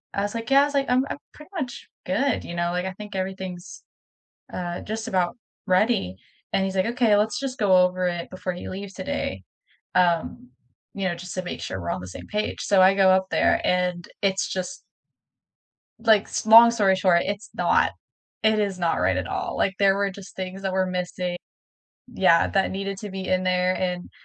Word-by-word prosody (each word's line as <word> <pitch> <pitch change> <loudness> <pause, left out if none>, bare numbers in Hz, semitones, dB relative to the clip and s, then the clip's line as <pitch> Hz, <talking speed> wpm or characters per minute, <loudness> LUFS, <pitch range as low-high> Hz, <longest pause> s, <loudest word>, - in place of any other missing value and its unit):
I 200 - 0
was, 205 - -3
like, 230 +3 -4
"Yeah," 275 +1 +6
I - - +3
was, 290 - -5
like, 275 -1 +1
"I'm 255 +2 +3
I'm - - -4 0.2
pretty 300 +5 -15
much 255 -4 -6 0.2
good," 260 +7 0
you 170 - -7
know, 170 0 0
like, 180 +1 -2
"I 190 - -4
think 210 +1 -9
everything's, 190 -1 -5 0.7
uh, 175 -1 -4
just 220 +2 -5
about 185 0 0 0.3
ready." 185 - +2 0.4
And 195 - +2
he's, 190 0 -3
like, 185 - +2
"Okay. 230 -4 +3
Let's 220 +4 +1
just 270 -1 -4
go 195 -4 +4
over 180 0 +3
it 175 -1 -4
before 185 0 -4
he 175 - -7
leaves 195 +1 -7
today," 95 - -4 0.5
um, 170 -8 +1 0.4
you 195 - -3
know, 175 - -1
just 180 +2 -8
to 185 - -2
make 180 - -6
sure 95 - -4
we're 85 - -4
on - - -2
the 90 - -8
same - - -9
page," 210 0 -2
so, 195 -2 +4
I 190 +1 +6
go 190 -1 +5
up 190 0 +3
there, - - +3
and 180 -1 0 0.2
it's 195 -1 +1
just 185 -1 -4 1.2
like 220 -3 +4
s - - -3
long 230 +2 +9
story 200 -5 +3
short, 185 -2 +3
it's 200 +3 -4
not - - +2 0.5
it 220 0 +3
is 200 -3 -1
not 170 -2 +1
right 90 +1 +2
at 90 -2 -3
all, - - -3
like, 195 - +1
there 195 -1 +4
were 200 0 0
just 195 0 -12
things 190 +1 -6
that 190 - -2
were 190 0 +2
missi 180 -1 -3 0.8
Yeah, 185 -6 +4
that 195 -1 +1
needed 195 0 -4
to 210 0 -7
be 190 0 -5
in 185 0 +1
there, 185 0 +2
and 180 -1 -3
190 Hz, 210 wpm, -24 LUFS, 180-205 Hz, 1.2 s, long